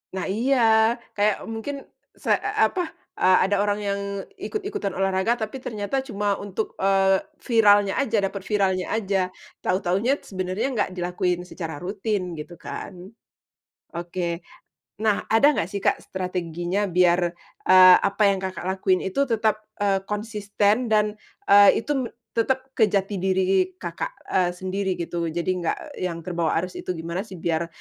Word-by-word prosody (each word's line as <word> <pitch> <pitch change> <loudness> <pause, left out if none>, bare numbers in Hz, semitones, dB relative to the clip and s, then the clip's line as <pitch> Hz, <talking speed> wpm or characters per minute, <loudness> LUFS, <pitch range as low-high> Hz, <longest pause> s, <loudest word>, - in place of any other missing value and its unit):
Nah 185 - -2
iya, 245 +7 +1 0.6
kayak 205 0 +2
mungkin 250 +6 -5 0.3
se - - +1
e - - -1 0.2
apa, 365 - -1 0.3
eee, 185 0 +4
ada 205 +1 +1
orang 205 0 0
yang 200 0 -1 0.4
ikut-ikutan 405 - -3
olahraga 195 +5 +1
tapi 225 +4 -5
ternyata 220 +3 -2
cuma 205 -6 -1
untuk, 205 +2 -4
eee, 195 0 +3 0.2
viralnya 205 -4 +5
aja 230 -5 0
dapat 195 0 -4
viralnya 190 -3 +1
aja, 195 -4 0 0.3
tahu-tahunya 195 +9 +1
sebenarnya 185 +4 -2
nggak 210 -5 0
dilakuin 180 0 -1
secara 165 -4 -6
rutin 190 0 -3
gitu 160 +2 -8
kan. 190 - -7 1.0
Oke, 170 0 -3 0.6
nah 215 -2 +1
ada 225 +6 +6
nggak 165 - -1
sih 200 - -3
Kak - - 0
strateginya 180 +1 -2
biar, 180 -1 +3 0.4
eee, 185 -1 +9
apa 205 +2 -2
yang 195 - +2
Kakak 185 -2 -5
lakuin 190 -1 +1
itu 195 +9 0
tetap, 220 -3 +1 0.2
eee, 195 -1 +1
konsisten 210 0 0 0.2
dan, 210 0 +2 0.3
eee, 200 +2 +7
itu 295 - -2
me 255 -3 -1 0.3
tetap 265 +3 0
ke 225 -4 +3
jati 195 0 -1
diri 185 0 +1
Kakak, 170 -1 -4 0.2
eee, 180 -2 +2
sendiri 190 +1 -2
gitu? 170 0 -3
Jadi 170 +3 -2
nggak 285 - -4
yang 170 -2 -3
terbawa 170 -2 -1
arus 180 - -6
itu 180 - -3
gimana 170 +5 -4
sih 190 - -10
biar, 170 -1 -1
195 Hz, 150 wpm, -24 LUFS, 180-215 Hz, 1.0 s, eee